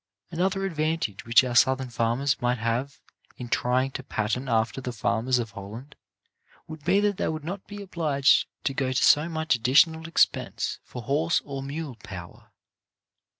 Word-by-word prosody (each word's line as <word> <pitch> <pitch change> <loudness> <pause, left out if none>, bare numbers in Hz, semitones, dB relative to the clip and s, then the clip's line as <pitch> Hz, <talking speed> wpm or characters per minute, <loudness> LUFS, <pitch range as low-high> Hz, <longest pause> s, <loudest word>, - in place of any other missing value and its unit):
Another 190 +3 0
advantage 155 - -2
which 115 +3 +6
our 125 -1 -3
Southern 130 +1 +3
farmers 120 +4 0
might 125 +1 +1
have 120 +5 -2 0.4
in 120 -1 -7
trying 130 +3 +1
to 135 - -5
pattern 125 +3 -2
after 115 +2 0
the 125 - -4
farmers 115 +2 0
of 115 -3 -3
Holland, 110 +7 -9 0.7
would 155 -2 -9
be 185 +5 +3
that 205 -2 +1
they - - -1
would 155 -1 -3
not 190 +3 -6
be 205 0 -8
obliged 155 -7 +2 0.2
to 135 - 0
go 130 -1 -1
to - - +1
so 150 +3 +5
much 160 -2 0
additional 160 +7 +3
expense 165 - +1
for 125 - -9
horse 155 +7 +1
or 140 -1 -5
mule 140 -2 -6
power. 90 -4 -11
135 Hz, 165 wpm, -26 LUFS, 120-160 Hz, 0.7 s, which